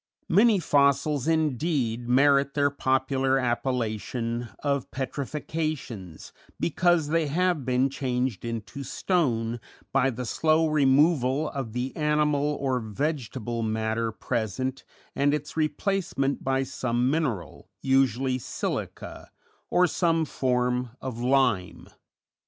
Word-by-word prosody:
Many 210 Hz, +4 st, +5 dB
fossils 140 Hz, -3 st, +2 dB
indeed 140 Hz, -6 st, 0 dB
merit 140 Hz, +2 st, +4 dB
their 145 Hz, -1 st, +2 dB
popular 130 Hz, 0 st, +1 dB
appellation 120 Hz, -2 st, -2 dB
of 140 Hz, -2 st, 0 dB
petrifactions, 135 Hz, -, -4 dB, 0.3 s
because 170 Hz, -2 st, +2 dB
they 165 Hz, -1 st, +1 dB
have 170 Hz, -1 st, 0 dB
been 125 Hz, +1 st, +2 dB
changed 130 Hz, -4 st, -2 dB
into 115 Hz, +3 st, -5 dB
stone 120 Hz, -9 st, 0 dB, 0.3 s
by 135 Hz, 0 st, +3 dB
the 125 Hz, 0 st, -4 dB
slow 155 Hz, +6 st, +2 dB
removal 145 Hz, -1 st, +3 dB
of 135 Hz, -6 st, -5 dB
the 125 Hz, +2 st, -3 dB
animal 150 Hz, -1 st, +1 dB
or 130 Hz, -2 st, 0 dB
vegetable 120 Hz, -1 st, -3 dB
matter 110 Hz, +1 st, -1 dB
present 120 Hz, +4 st, -3 dB, 0.3 s
and 145 Hz, +1 st, +2 dB
its 150 Hz, -1 st, -6 dB
replacement 155 Hz, -3 st, -1 dB
by 135 Hz, 0 st, +1 dB
some 125 Hz, -1 st, -1 dB
mineral, 130 Hz, -, -3 dB
usually 130 Hz, -1 st, +2 dB
silica -, -, -5 dB, 0.4 s
or 180 Hz, 0 st, +4 dB
some 165 Hz, -1 st, +1 dB
form 125 Hz, -2 st, 0 dB
of 125 Hz, -3 st, -5 dB
lime. 125 Hz, -7 st, +1 dB
135 Hz, 105 wpm, -26 LUFS, 120-150 Hz, 0.4 s, Many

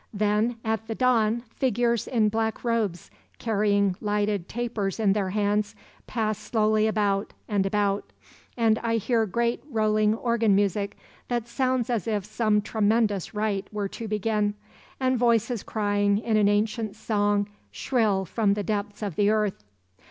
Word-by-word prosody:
"Then 210 Hz, +3 st, +1 dB
at 220 Hz, 0 st, -1 dB
the 225 Hz, -, -3 dB
dawn 235 Hz, -2 st, +2 dB
figures 235 Hz, -3 st, +1 dB
in 220 Hz, -4 st, +2 dB
black 220 Hz, +1 st, -2 dB
robes, 220 Hz, -8 st, -1 dB, 0.3 s
carrying 205 Hz, -3 st, +1 dB
lighted 205 Hz, -3 st, -1 dB
tapers 225 Hz, -4 st, -2 dB
in 205 Hz, -3 st, +3 dB
their 195 Hz, -2 st, -1 dB
hands 205 Hz, +1 st, 0 dB, 0.3 s
pass 215 Hz, -3 st, -1 dB
slowly 215 Hz, 0 st, +2 dB
about 205 Hz, -2 st, 0 dB
and 200 Hz, -3 st, +1 dB
about; 200 Hz, 0 st, 0 dB, 0.5 s
and 225 Hz, -2 st, +3 dB
I 230 Hz, -1 st, 0 dB
hear 225 Hz, 0 st, +1 dB
great 235 Hz, +4 st, -1 dB
rolling 215 Hz, -2 st, +2 dB
organ 230 Hz, -3 st, +2 dB
music 200 Hz, 0 st, 0 dB, 0.3 s
that 240 Hz, -2 st, -2 dB
sounds 255 Hz, 0 st, 0 dB
as 230 Hz, -2 st, -1 dB
if 210 Hz, -4 st, -1 dB
some 215 Hz, -1 st, +1 dB
tremendous 215 Hz, -2 st, +1 dB
rite 210 Hz, -2 st, -1 dB
were 205 Hz, -2 st, -3 dB
to 225 Hz, -, -6 dB
begin, 210 Hz, 0 st, 0 dB, 0.4 s
and 255 Hz, -2 st, +1 dB
voices 235 Hz, -1 st, +2 dB
crying 205 Hz, -1 st, +1 dB
in 220 Hz, 0 st, -1 dB
an 210 Hz, -1 st, +4 dB
ancient 215 Hz, 0 st, 0 dB
song 205 Hz, -2 st, 0 dB, 0.2 s
shrill 215 Hz, -7 st, 0 dB
from 200 Hz, +1 st, +1 dB
the 205 Hz, -, -2 dB
depths 205 Hz, +1 st, -3 dB
of 200 Hz, -6 st, -3 dB
the 205 Hz, +2 st, +3 dB
earth. 210 Hz, -, 0 dB
215 Hz, 150 wpm, -26 LUFS, 205-230 Hz, 0.5 s, an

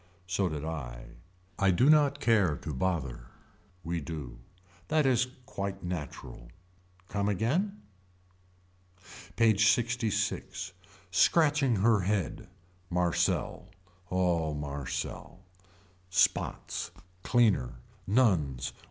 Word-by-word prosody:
So 90 Hz, +1 st, 0 dB
did 75 Hz, -1 st, -4 dB
I. -, -, -6 dB, 0.5 s
I 100 Hz, -, +4 dB
do 95 Hz, +9 st, +4 dB
not 145 Hz, -2 st, +5 dB
care 105 Hz, -, +3 dB
to 75 Hz, -, -6 dB
bother. 65 Hz, -6 st, -2 dB, 0.6 s
We 85 Hz, 0 st, -2 dB
do. 70 Hz, -6 st, -7 dB, 0.5 s
That 155 Hz, -1 st, +2 dB
is 130 Hz, -1 st, +3 dB, 0.2 s
quite 100 Hz, -3 st, -5 dB
natural. 75 Hz, -8 st, -6 dB, 0.6 s
Come 100 Hz, 0 st, -1 dB
again. 160 Hz, -, 0 dB, 1.5 s
PAGE 110 Hz, -2 st, +4 dB
LXVI. 110 Hz, -5 st, 0 dB, 0.4 s
Scratching 145 Hz, -, +4 dB
her 110 Hz, +2 st, +4 dB
head. 95 Hz, -1 st, -1 dB, 0.4 s
Marcel. 90 Hz, -1 st, 0 dB, 0.4 s
Oh 85 Hz, -4 st, +1 dB
Marcel. 70 Hz, +4 st, -5 dB, 0.7 s
Spots. 90 Hz, -, 0 dB, 0.3 s
Cleaner. 105 Hz, -, +2 dB, 0.3 s
Nuns. 85 Hz, -, +2 dB
95 Hz, 90 wpm, -30 LUFS, 75-115 Hz, 1.5 s, not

